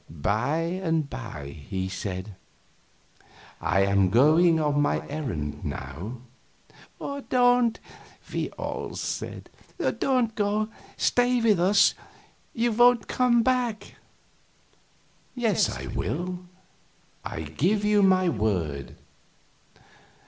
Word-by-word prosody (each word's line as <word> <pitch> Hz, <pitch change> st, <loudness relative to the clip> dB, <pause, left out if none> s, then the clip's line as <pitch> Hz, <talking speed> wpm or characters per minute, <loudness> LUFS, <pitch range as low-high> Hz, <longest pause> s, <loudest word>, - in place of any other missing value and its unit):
By 110 Hz, -, 0 dB, 0.2 s
and 160 Hz, -4 st, 0 dB
by 75 Hz, -, -8 dB
he 95 Hz, -2 st, -2 dB
said: 95 Hz, +1 st, -5 dB, 1.3 s
"I 95 Hz, -, +2 dB
am 100 Hz, -1 st, +3 dB
going 160 Hz, -, +5 dB
on 145 Hz, -1 st, +1 dB
my 145 Hz, -, 0 dB
errand 110 Hz, -, -4 dB
now." 90 Hz, -, -6 dB, 1.1 s
"Don't!" 245 Hz, -2 st, +3 dB, 0.5 s
we -, -, -1 dB
all -, -, -5 dB
said. -, -, -5 dB, 0.5 s
"Don't 250 Hz, -4 st, +1 dB
go; 210 Hz, +1 st, 0 dB, 0.3 s
stay 245 Hz, 0 st, +2 dB
with 220 Hz, -5 st, +3 dB
us. 195 Hz, +3 st, +5 dB, 0.6 s
You 235 Hz, 0 st, +1 dB
won't 240 Hz, -1 st, +4 dB
come 240 Hz, -2 st, +3 dB
back." 245 Hz, -4 st, -1 dB, 1.4 s
"Yes, 225 Hz, -7 st, +2 dB
I -, -, -5 dB
will; 180 Hz, +2 st, -3 dB, 0.8 s
I -, -, -5 dB
give 180 Hz, -, 0 dB
you 210 Hz, 0 st, +4 dB
my 185 Hz, -1 st, +4 dB
word." 90 Hz, -, -1 dB
165 Hz, 100 wpm, -26 LUFS, -, 1.4 s, going